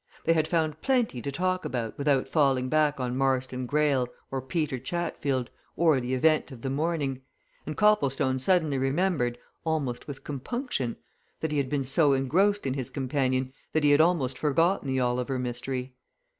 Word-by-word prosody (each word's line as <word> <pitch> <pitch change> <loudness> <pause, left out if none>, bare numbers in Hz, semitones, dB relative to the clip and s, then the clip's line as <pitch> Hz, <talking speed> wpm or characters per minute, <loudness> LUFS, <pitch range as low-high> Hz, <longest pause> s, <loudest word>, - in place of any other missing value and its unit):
They 165 - +5
had 160 -1 +1
found 160 -2 0
plenty 245 - +1
to 140 - -3
talk 185 +5 0
about 120 -3 -3
without 140 -2 +1
falling 135 -3 +2
back 150 -1 +2
on 125 -1 -2
Marston 130 -1 0
Greyle, 145 -3 +2 0.2
or 135 -1 -2
Peter 140 -1 -2
Chatfield, 140 -4 -2 0.2
or 160 -6 +3
the 125 +1 -1
event 155 +3 +2
of 120 -3 -11
the 135 - -1
morning, 145 -3 -1 0.5
and 155 - -4
Copplestone 135 -11 +2
suddenly 155 -2 +2
remembered, 135 -3 0 0.3
almost 150 -7 -2
with 140 -2 -8
compunction, 145 - -3 0.4
that 160 - -1
he 150 - +1
had 135 -2 -1
been 140 -1 0
so 140 +2 +3
engrossed 185 +10 +2
in 135 - 0
his 130 -3 -3
companion 130 -1 -1 0.2
that 155 - +2
he 145 - +5
had 145 +2 +6
almost 145 -7 +1
forgotten 165 +3 +2
the 130 -1 0
Oliver 125 +1 0
mystery. 125 +1 -4
140 Hz, 170 wpm, -27 LUFS, 130-160 Hz, 0.5 s, had